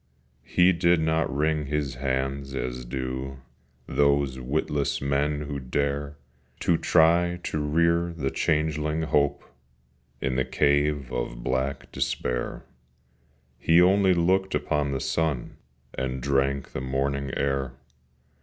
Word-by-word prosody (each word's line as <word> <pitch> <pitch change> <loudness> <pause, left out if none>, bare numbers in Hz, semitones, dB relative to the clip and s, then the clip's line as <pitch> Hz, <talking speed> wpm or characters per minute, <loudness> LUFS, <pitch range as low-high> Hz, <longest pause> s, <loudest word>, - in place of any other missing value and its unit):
He 90 +1 +4
did 85 0 +3
not 80 0 +1
wring 75 +1 0
his 75 -1 -1
hands, 65 +1 -2
as 65 -1 -4
do 65 +1 -4 0.5
Those 70 -2 +1
witless 70 +2 -1
men 70 +2 0
who 70 -1 -4
dare 70 +2 -2 0.4
To 85 - +3
try 85 +2 +3
to 75 - -2
rear 85 +3 +2
the 70 -5 -3
changeling 75 +1 0
Hope 70 -2 +1 0.8
In 65 -1 -1
the 65 - +2
cave 70 -2 +1
of - - -4
black 65 +2 -2
Despair: 60 0 -2 0.9
He 80 +7 +4
only 95 +1 +5
looked 95 +3 +2
upon 75 -2 0
the 65 - -1
sun, 75 -3 -1 0.4
And 65 0 -3
drank 70 +1 0
the - - -4
morning 70 +1 -1
air. 70 -2 -1
70 Hz, 120 wpm, -26 LUFS, 65-80 Hz, 0.9 s, only